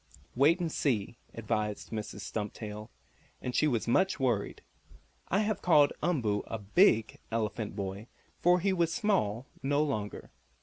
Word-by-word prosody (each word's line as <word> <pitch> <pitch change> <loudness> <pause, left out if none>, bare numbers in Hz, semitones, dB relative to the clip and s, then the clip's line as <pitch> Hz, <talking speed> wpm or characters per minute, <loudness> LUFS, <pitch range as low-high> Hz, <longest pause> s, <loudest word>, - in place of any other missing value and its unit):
"Wait 150 +8 +4
and 170 -2 -2
see," 120 -5 -1 0.2
advised 105 -2 -2
Mrs. 110 -2 -5
Stumptail, 105 0 -5 0.5
and 125 - -4
she 155 - +3
was 120 -6 0
much 190 +9 +2
worried. 120 -6 -1 0.6
I 195 - +2
have 215 -1 -1
called 150 -5 +5
Umboo 120 -12 +1
a 115 - -3
"big" 110 - +3
elephant 110 -2 -2
boy, 100 +2 -5 0.3
for 180 +1 +4
he 195 +1 +2
was 170 -3 +1
small 170 - 0 0.2
no 145 +2 +2
longer. 110 -9 -4
120 Hz, 140 wpm, -30 LUFS, 105-165 Hz, 0.6 s, called